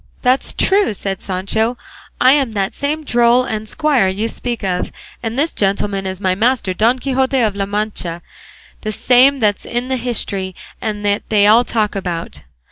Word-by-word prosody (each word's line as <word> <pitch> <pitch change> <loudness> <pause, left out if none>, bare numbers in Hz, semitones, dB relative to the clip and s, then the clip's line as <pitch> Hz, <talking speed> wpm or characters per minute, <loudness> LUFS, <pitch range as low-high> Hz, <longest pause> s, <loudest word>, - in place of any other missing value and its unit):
"That's 255 +1 +2
true," 390 - +2
said 195 0 -4
Sancho; 220 +6 -1 0.4
"I 255 - +6
am 270 -5 +2
that 195 -2 -1
same 300 +2 -2
droll 240 -1 +3
and 220 -3 -4
squire 290 -10 +2
you 200 +4 -1
speak 235 -1 -4
of, 180 -2 -1 0.3
and 225 +1 -4
this 310 +4 +1
gentleman 195 -1 -1
is 190 -1 -5
my 185 -2 +1
master 225 -1 +1
Don 230 +7 +2
Quixote 265 0 0
of 215 -4 +1
La 195 -1 -2
Mancha, 200 -5 -2 0.6
the 215 - -3
same 255 +6 +4
that's 210 -5 0
in 245 +2 -3
the 260 - 0
history 200 -6 -2 0.3
and 210 -2 -3
that 205 +1 +1
they 210 -2 +4 0.2
talk 215 -3 0
about." 175 -4 -4
220 Hz, 170 wpm, -17 LUFS, 195-250 Hz, 0.6 s, I